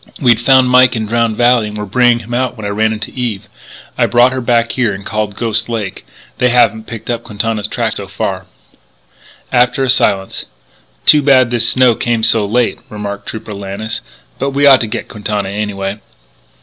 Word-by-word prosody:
We'd 120 -4 +3
found 130 +1 +4
Mike 125 0 +5
in 110 -1 -2
Drowned 115 0 0
Valley 120 -2 +3
and 105 0 -7
were 105 - -4
bringing 120 +3 +2
him 120 +3 -8
out 125 0 -1
when 110 - -7
I - - -2
ran 110 +2 0
into 110 -1 -5
Eve.... 120 -6 -4 0.5
I - - +3
brought 120 +1 +4
her 130 0 -3
back 115 -1 +1
here 120 -6 0
and 100 0 -10
called 105 -2 -3
Ghost 115 +1 +1
Lake.... 110 -5 -5 0.3
They 125 - +3
haven't 110 -3 +2
picked 115 +1 -6
up 120 -1 -3
Quintana's 105 -1 -3
tracks - - -2
so - - -6
far." - - -4 1.0
After 125 +2 +2
a 130 - +3
silence: 95 -7 0 0.6
"Too 150 - +7
bad 130 -3 +4
this 120 -1 +1
snow 130 -2 +4
came 115 0 -1
so 110 -2 +3
late," 120 +2 0
remarked 100 -1 -6
Trooper 110 -1 -7
Lannis. 100 +3 -5 0.4
"But 135 +1 -2
we 145 +1 +3
ought 135 -2 +7
to 115 - -1
get 110 - -5
Quintana 105 -2 -4
anyway." 100 0 -4
115 Hz, 190 wpm, -14 LUFS, 105-125 Hz, 1.0 s, Too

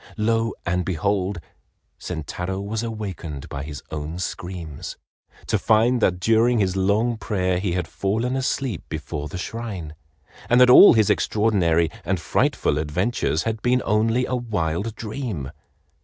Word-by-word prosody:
Lo, 115 +1 +1
and 90 +1 0
behold, 95 +2 -1 0.6
Sentaro 90 +3 -4
was 105 +2 -3
awakened 95 -11 -5
by 70 - -5
his 75 0 -7
own 80 +2 -4
screams, 90 -3 -6 0.5
to - - 0
find 115 +3 +3
that 90 -3 +2
during 115 +5 +3
his 95 -3 +1
long 105 +5 +1
prayer 95 -4 -1
he 95 -2 -1
had 90 -2 -1
fallen 110 +9 -1
asleep 130 -5 -1
before 75 -1 -4
the 85 - -6
shrine, 95 -6 -5 0.6
and 120 - +5
that 125 0 +7
all 200 - +10
his 110 -3 +4
extraordinary 85 -7 +2
and 95 +2 -1
frightful 75 -2 +1
adventures 80 +2 0
had 110 -1 -2
been 125 +2 +2
only 115 +4 +2
a - - -4
wild 105 -4 -2
dream. 110 - -5
100 Hz, 140 wpm, -23 LUFS, 85-115 Hz, 0.6 s, all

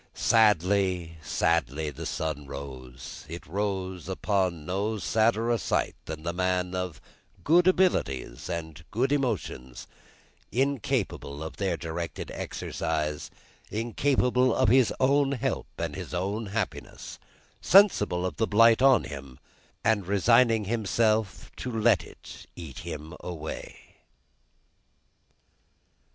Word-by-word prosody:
Sadly, 95 -5 +2
sadly, 75 +1 0
the 80 +3 -6
sun 75 -3 -3
rose; 65 -3 -8
it 85 +2 -7
rose 95 -1 -3
upon 95 -5 0
no 100 +5 -1
sadder 115 +3 +2
sight - - 0
than 80 0 -6
the 85 +1 -2
man 90 0 0
of 90 -3 -3 0.4
good 175 +3 +5
abilities 70 - +1
and 80 -2 -5
good 130 +5 0
emotions, 110 - -2 0.7
incapable 120 - -1
of 80 - -7
their 95 -4 0
directed 80 -2 -5
exercise, 75 -2 -3 0.4
incapable 125 +2 +1
of 130 -4 +3
his 130 0 +5
own 140 +1 +3
help 135 0 -2
and - - -3
his - - -6
own 100 +5 -2
happiness, 105 0 -5 0.4
sensible 105 - +5
of 90 - -3
the 110 - +1
blight 115 +3 +5
on 135 -5 +6
him, 70 -3 -8 0.5
and 105 -4 +2
resigning 115 +2 +4
himself 110 -1 0
to 125 - -4
let 110 -3 +3
it - - -13
eat 75 -8 -8
him 80 +2 -7
away. 80 -3 -8
95 Hz, 110 wpm, -27 LUFS, 80-115 Hz, 0.7 s, on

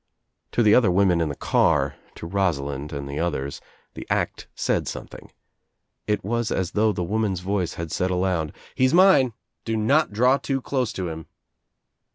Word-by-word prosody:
To 120 - +3
the 105 -1 +5
other 110 -5 +5
women 90 -2 +3
in 80 - 0
the 70 - -4
car, - - +2 0.2
to - - -8
Rosa 90 -5 0
lind 70 +1 -5
and 70 -1 -5
the 70 +1 -5
others 70 -5 -2 0.3
the - - -9
act - - -1
said - - 0
something. - - -8 0.8
It 105 -1 0
was 115 +3 -1
as 95 -2 -1
though 110 +1 +2
the 90 -3 -3
woman's 100 -1 -1
voice 95 -2 -2
had 85 -2 -5
said 90 - 0
aloud, 90 -4 0 0.2
"He 130 - +2
is 130 - +3
mine. 175 -10 +5 0.3
Do 115 -1 -2
not 135 +8 +2
draw 125 +6 +3
too 135 0 -2
close 130 -3 -1
to 90 -2 -3
him." 80 -1 -7
95 Hz, 185 wpm, -24 LUFS, 85-115 Hz, 0.8 s, the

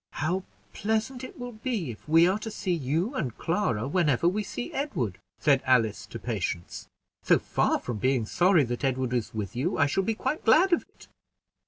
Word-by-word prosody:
"How 175 +6 -1 0.3
pleasant 220 +5 -1
it 255 - -9
will 245 0 -6
be, 215 - -3
if 115 - -13
we 165 +2 +6
are 190 +3 +1
to 220 - -5
see 205 -3 -3
you 165 - -1
and 130 - -3
Clara 150 - 0
whenever 150 -1 +2
we 200 +4 +1
see 120 - -6
Edward!" 130 - -2 0.2
said 140 -3 +3
Alice 110 -5 +2
to 115 - -7
Patience. 100 -7 -4 0.3
"So - - +4
far - - +1
from 120 -3 -5
being 130 +1 +1
sorry 175 - +4
that 120 +2 -4
Edward 130 -2 0
is 120 -3 -2
with 105 -1 -4
you, 145 +10 -1
I 145 - +4
shall 150 +7 +1
be 220 +3 -1
quite 300 +7 -2
glad 345 +11 +5
of - - +3
it." - - -19
155 Hz, 195 wpm, -27 LUFS, -, 0.3 s, we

